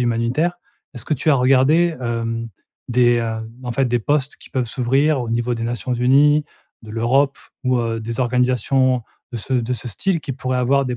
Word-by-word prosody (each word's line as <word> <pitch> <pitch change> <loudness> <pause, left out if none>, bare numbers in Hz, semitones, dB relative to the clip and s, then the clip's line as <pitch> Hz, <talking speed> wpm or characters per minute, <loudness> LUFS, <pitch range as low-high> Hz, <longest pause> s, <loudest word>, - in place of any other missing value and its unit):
humanitaire, 120 +8 0 0.4
est-ce 120 - -6
que 155 - 0
tu 155 +4 +1
as - - +5
regardé, 135 +6 +3
hem, 115 -1 -3 0.4
des, 120 -1 +3
heu, 110 -1 -4 0.2
en 120 - -3
fait, 135 +2 +1
des 120 0 +1
postes 145 +4 0
qui - - -14
peuvent 130 -3 0
s'ouvrir 135 +5 +1
au 115 - -5
niveau 120 +1 0
des 115 - -5
Nations 120 +1 -2
unies, 145 +5 +4 0.4
de 110 - -11
l'Europe 130 +5 +1 0.3
ou, 125 -1 +2
heu, 115 -1 -2
des 115 +2 -5
organisations 125 +1 +2 0.3
de - - -4
ce 130 - -4
de 125 0 0
ce 125 - -6
style 175 - -1
qui 135 - -5
pourraient 130 0 -2
avoir 135 +2 +2
des 125 -1 -3
125 Hz, 195 wpm, -20 LUFS, 115-135 Hz, 0.4 s, as